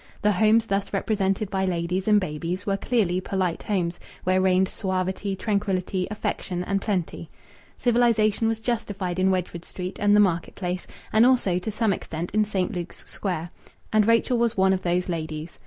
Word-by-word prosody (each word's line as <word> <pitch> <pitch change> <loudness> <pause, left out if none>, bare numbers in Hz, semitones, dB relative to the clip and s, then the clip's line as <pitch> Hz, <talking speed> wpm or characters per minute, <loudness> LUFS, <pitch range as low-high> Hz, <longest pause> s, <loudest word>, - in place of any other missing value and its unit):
The 210 - +4
homes 215 +3 +4
thus 195 -2 -1
represented 195 0 0
by 190 -1 0
ladies 180 +1 -1
and 210 -1 +6
babies 175 +2 -4
were 195 - +1
clearly 195 -4 +1
polite 185 -3 -1
homes, 180 -4 -1 0.2
where 185 +1 +2
reigned 190 0 +3
suavity, 190 0 -2
tranquillity, 190 -3 -1
affection, 185 -3 -3
and 195 +2 -1
plenty. 180 -5 -2 0.5
Civilization 230 -3 +3
was 225 0 0
justified 205 -6 -2
in 190 +1 +3
Wedgwood 180 -2 -2
Street 180 +1 -6
and 205 0 +4
the - - +6
market 175 -5 +1
place 180 -1 -3 0.3
and 220 +1 +6
also, 240 -8 +3
to 180 - -4
some 215 -1 +1
extent, 165 -1 -5
in 215 +1 +2
St. 190 -3 -1
Luke's 175 -1 -6
Square.... 175 -4 -3 0.4
And 215 -1 +4
Rachel 230 +1 +3
was 235 -1 +1
one 190 0 +4
of 190 - -1
these 180 0 0
ladies. 160 -2 -5
190 Hz, 170 wpm, -25 LUFS, 180-210 Hz, 0.5 s, and